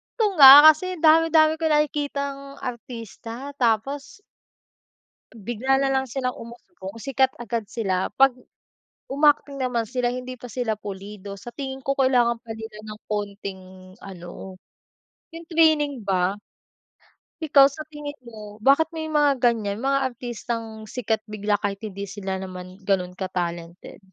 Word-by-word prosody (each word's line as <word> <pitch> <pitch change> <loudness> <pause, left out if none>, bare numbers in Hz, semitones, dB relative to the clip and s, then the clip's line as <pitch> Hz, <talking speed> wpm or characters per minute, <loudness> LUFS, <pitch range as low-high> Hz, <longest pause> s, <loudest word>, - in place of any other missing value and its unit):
Ito 450 - +2
nga, 270 -3 +12 0.2
kasi 315 +4 +5
dami 320 0 +6
dami 310 -1 +5
ko 325 - -1
nakikitang 280 -2 -1
artista. 230 -2 -7 0.2
Tapos 270 - -1 1.1
Bigla 240 +5 -1
na 275 - +1
lang 265 0 +1
silang 255 0 -3
umuusbong, 230 -4 -11
sikat 265 +1 +1
agad 230 -1 -3
sila. 190 -5 -2
'Pag 265 +3 +4 0.7
um, 280 +3 -1
acting 290 -1 +2
naman 245 -3 -1
sila, 250 0 -1
hindi 255 0 -6
pa 245 0 -10
sila 230 -3 -2
pulido. 200 0 -8
Sa 240 - -9
tingin 265 0 -6
ko, 275 0 -1
kailangan 245 -3 +2
pa 225 - -7
nila 220 -1 -9
ng 210 0 -9
konting 200 -2 -4 0.4
ano, 185 0 -10 0.8
yung 330 0 -9
training 300 -6 +3
ba. 190 0 +1 1.1
Ikaw, 285 -3 +6
sa 310 +2 -8
tingin 295 -1 -7
mo? 215 -3 -11
Bakit 280 +5 +4
may 315 -1 -4
mga 295 -2 +3
ganyan, 220 -4 +1
mga 275 -1 +1
artistang 230 -2 -6
sikat 225 -1 -2
bigla 210 -1 -1
kahit 200 -1 -2
hindi 200 -2 -5
sila 190 -1 -4
naman 185 0 -9
ganon 185 -2 +1
ka-talented? 175 -2 -5
240 Hz, 140 wpm, -23 LUFS, 205-275 Hz, 1.1 s, nga